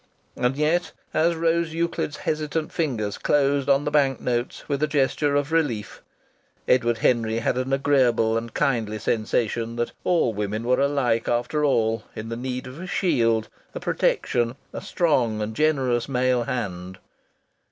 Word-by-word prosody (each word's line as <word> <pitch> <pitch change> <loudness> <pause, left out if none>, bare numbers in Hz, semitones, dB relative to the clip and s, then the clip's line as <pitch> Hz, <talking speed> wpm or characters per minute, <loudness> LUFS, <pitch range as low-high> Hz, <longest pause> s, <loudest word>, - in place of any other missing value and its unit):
And 125 +2 0
yet, 160 +3 +1 0.2
as 165 +2 +2
Rose 165 0 0
Euclid's 170 -3 -2
hesitant 155 0 -2
fingers 115 -11 -2
closed 140 -1 +2
on 140 +1 +3
the 150 - -1
bank 140 -3 +2
notes 120 0 -2
with 140 -1 -1
a 155 - +3
gesture 145 0 +1
of 145 +1 0
relief, 130 -11 -1 0.7
Edward 120 -2 +3
Henry 115 -1 +1
had 115 - 0
an 130 +1 -2
agreeable 130 -5 +3
and 115 0 -3
kindly 110 -5 0
sensation 115 +1 -1
that 120 0 -2
all 165 -10 +2
women 105 +2 -3
were 125 +2 +2
alike, 135 -5 +1
after 120 +6 0
all, 115 -5 +1
in 110 +1 -6
the 115 - -3
need 125 +2 -4
of 130 +6 -9
a 185 - -6
shield, 115 - +1 0.3
a - - -3
protection, 120 0 0 0.2
a - - -5
strong 125 -10 +1
and 105 +1 -3
generous 135 -5 +1
male 125 -2 +1
hand. 95 -7 -4
125 Hz, 155 wpm, -24 LUFS, 115-145 Hz, 0.7 s, on